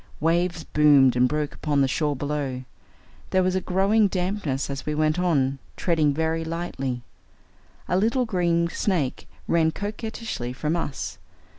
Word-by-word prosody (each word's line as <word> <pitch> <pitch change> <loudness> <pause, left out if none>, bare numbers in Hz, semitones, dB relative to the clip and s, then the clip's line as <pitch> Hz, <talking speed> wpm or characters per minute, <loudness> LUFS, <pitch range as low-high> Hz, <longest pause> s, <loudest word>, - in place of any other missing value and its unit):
Waves 170 +1 +1
boomed 145 -5 +5
and 125 0 +4
broke 150 -1 -2
upon 145 -2 0
the 135 - +4
shore 145 +2 0
below. 140 -2 -3 0.7
There 185 0 +3
was 185 0 +1
a 185 - 0
growing 200 +4 +3
dampness 180 -7 -2
as 140 -1 -5
we 150 - -2
went 155 +2 +1
on, 140 -7 +1 0.2
treading 160 -4 +2
very 160 +2 -1
lightly. 150 -7 -4 0.8
A - - 0
little 235 +5 +2
green 170 -5 +1
snake 165 -6 -1 0.2
ran 165 -1 +3
coquettishly 210 - -5
from 150 +5 -1
us. 145 -5 -4
160 Hz, 145 wpm, -25 LUFS, 140-180 Hz, 0.8 s, boomed